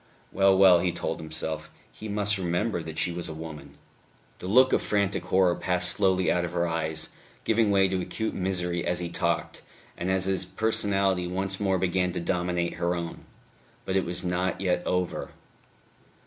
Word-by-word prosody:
Well, 95 Hz, 0 st, +4 dB
well, 95 Hz, -2 st, +7 dB
he 90 Hz, 0 st, +1 dB
told -, -, -3 dB
himself, 80 Hz, 0 st, -4 dB, 0.2 s
he 110 Hz, -, -9 dB
must 105 Hz, -1 st, 0 dB
remember 90 Hz, +2 st, -1 dB
that 80 Hz, -1 st, -8 dB
she 90 Hz, -, +1 dB
was 85 Hz, -1 st, -5 dB
a 80 Hz, -, -6 dB
woman. 80 Hz, -1 st, -9 dB, 0.6 s
The 90 Hz, -, -6 dB
look 130 Hz, +6 st, +5 dB
of -, -, +3 dB
frantic 100 Hz, -3 st, 0 dB
horror 95 Hz, -2 st, +3 dB
passed 90 Hz, 0 st, +2 dB
slowly 95 Hz, -1 st, +2 dB
out 90 Hz, -, +1 dB
of 85 Hz, -, -4 dB
her 85 Hz, 0 st, +1 dB
eyes, 80 Hz, -1 st, -2 dB, 0.3 s
giving 110 Hz, -1 st, +2 dB
way 95 Hz, -1 st, +4 dB
to 95 Hz, -1 st, -1 dB
acute 110 Hz, +4 st, -3 dB
misery 90 Hz, -2 st, -1 dB
as 90 Hz, 0 st, 0 dB
he 85 Hz, -1 st, -3 dB
talked, 85 Hz, 0 st, -1 dB, 0.3 s
and 90 Hz, -, -3 dB
as 95 Hz, 0 st, +1 dB
his 95 Hz, -1 st, 0 dB
personality 95 Hz, -2 st, +1 dB
once 95 Hz, +2 st, -2 dB
more 95 Hz, -2 st, +1 dB
began 90 Hz, 0 st, 0 dB
to -, -, -2 dB
dominate 90 Hz, 0 st, -1 dB
her 85 Hz, +1 st, +1 dB
own. 85 Hz, -1 st, -6 dB, 0.6 s
But 95 Hz, -, -2 dB
it 95 Hz, -, +3 dB
was 85 Hz, +2 st, -2 dB
not 90 Hz, +1 st, -1 dB
yet 90 Hz, -2 st, +1 dB
over. 90 Hz, -1 st, -2 dB
90 Hz, 180 wpm, -27 LUFS, 85-95 Hz, 0.6 s, well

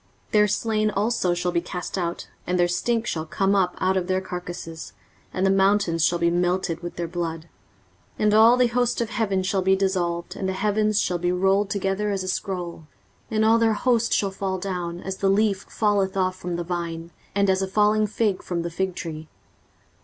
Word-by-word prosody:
23:034:003 -, -, -33 dB
Their 210 Hz, -1 st, +5 dB
slain 215 Hz, +1 st, 0 dB
also 205 Hz, -3 st, 0 dB
shall 175 Hz, 0 st, -1 dB
be 170 Hz, -1 st, +1 dB
cast 180 Hz, +1 st, -5 dB
out, 175 Hz, -2 st, -3 dB, 0.2 s
and 180 Hz, 0 st, 0 dB
their 175 Hz, -, +4 dB
stink 230 Hz, +6 st, 0 dB
shall 160 Hz, -7 st, -3 dB
come 195 Hz, +4 st, +1 dB
up 190 Hz, -3 st, +2 dB
out 185 Hz, +1 st, +1 dB
of 185 Hz, -2 st, -1 dB
their 185 Hz, 0 st, +1 dB
carcases, 175 Hz, -, -7 dB, 0.4 s
and 185 Hz, -, -1 dB
the 195 Hz, -, +4 dB
mountains 195 Hz, -4 st, +2 dB
shall 175 Hz, -, +3 dB
be 170 Hz, 0 st, +2 dB
melted 175 Hz, -1 st, 0 dB
with 175 Hz, 0 st, -6 dB
their 170 Hz, -1 st, -3 dB
blood. 165 Hz, -1 st, -3 dB, 0.8 s
23:034:004 -, -, -2 dB
And 210 Hz, 0 st, +4 dB
all 225 Hz, +3 st, +7 dB
the 250 Hz, -, +4 dB
host 245 Hz, 0 st, 0 dB
of 230 Hz, -1 st, -2 dB
heaven 195 Hz, -5 st, 0 dB
shall 195 Hz, 0 st, 0 dB
be 190 Hz, +1 st, +3 dB
dissolved, 180 Hz, -3 st, -1 dB
and 190 Hz, -, -2 dB
the -, -, -1 dB
heavens 210 Hz, +2 st, +1 dB
shall 180 Hz, -1 st, 0 dB
be 175 Hz, +1 st, 0 dB
rolled 195 Hz, +2 st, +2 dB
together 200 Hz, 0 st, -1 dB
as 195 Hz, -2 st, -1 dB
a -, -, -6 dB
scroll: 180 Hz, -4 st, -4 dB, 0.4 s
and 220 Hz, 0 st, +1 dB
all 225 Hz, +1 st, +5 dB
their 225 Hz, -1 st, +3 dB
host 235 Hz, +1 st, +1 dB
shall 200 Hz, -2 st, +1 dB
fall 190 Hz, -1 st, -3 dB
down, 180 Hz, -2 st, -4 dB
as 190 Hz, 0 st, -5 dB
the 195 Hz, -, +1 dB
leaf 200 Hz, 0 st, +1 dB
falleth 200 Hz, -3 st, +1 dB
off 185 Hz, -1 st, +1 dB
from 180 Hz, -1 st, -4 dB
the 175 Hz, -, -2 dB
vine, 170 Hz, -1 st, -4 dB, 0.2 s
and 200 Hz, 0 st, +3 dB
as 190 Hz, 0 st, +2 dB
a 190 Hz, -, -1 dB
falling 210 Hz, +2 st, +3 dB
fig 210 Hz, -2 st, 0 dB
from 170 Hz, -2 st, -3 dB
the 170 Hz, -, -4 dB
fig 190 Hz, +1 st, -2 dB
tree. 155 Hz, -1 st, -6 dB
190 Hz, 215 wpm, -24 LUFS, 175-210 Hz, 0.8 s, all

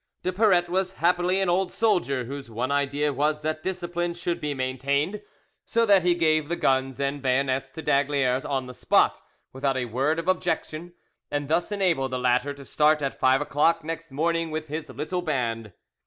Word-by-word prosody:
De 185 Hz, -, 0 dB
Paratte 185 Hz, -3 st, +3 dB
was 185 Hz, +1 st, 0 dB
happily 180 Hz, +1 st, +1 dB
an 195 Hz, -, +1 dB
old 180 Hz, +1 st, +1 dB
soldier, 175 Hz, -, +1 dB
whose 135 Hz, +1 st, -7 dB
one 120 Hz, +4 st, -2 dB
idea 145 Hz, +1 st, 0 dB
was 150 Hz, +3 st, 0 dB
that 155 Hz, +1 st, -2 dB
discipline 175 Hz, -1 st, -3 dB
should 170 Hz, 0 st, -3 dB
be 150 Hz, -1 st, -2 dB
maintained, 140 Hz, +8 st, -1 dB, 0.4 s
so 230 Hz, 0 st, +1 dB
that 200 Hz, -3 st, +5 dB
he 175 Hz, 0 st, +2 dB
gave 155 Hz, -3 st, +2 dB
the 170 Hz, -, 0 dB
guns 135 Hz, -3 st, 0 dB
and 140 Hz, +1 st, -2 dB
bayonets 130 Hz, 0 st, 0 dB
to 160 Hz, -, -9 dB
d'Aygaliers 140 Hz, -2 st, +1 dB
on 135 Hz, -3 st, -2 dB
the 125 Hz, -, -9 dB
spot, -, -, +2 dB, 0.3 s
without 135 Hz, 0 st, -1 dB
a 125 Hz, -, -1 dB
word 135 Hz, +7 st, 0 dB
of 165 Hz, +1 st, -4 dB
objection, 175 Hz, -2 st, -1 dB, 0.4 s
and 145 Hz, -1 st, -3 dB
thus 170 Hz, +5 st, +1 dB
enabled 180 Hz, -10 st, +1 dB
the 130 Hz, -, -2 dB
latter 125 Hz, +2 st, +1 dB
to 140 Hz, -1 st, -10 dB
start 150 Hz, +1 st, +2 dB
at 135 Hz, -, -3 dB
five 130 Hz, +2 st, +4 dB
o'clock 155 Hz, +3 st, +2 dB
next 165 Hz, +1 st, -5 dB
morning 165 Hz, +4 st, 0 dB
with 155 Hz, -1 st, -5 dB
his 155 Hz, +1 st, -5 dB
little 180 Hz, +4 st, -3 dB
band. 115 Hz, -, -2 dB
150 Hz, 185 wpm, -25 LUFS, 135-175 Hz, 0.4 s, that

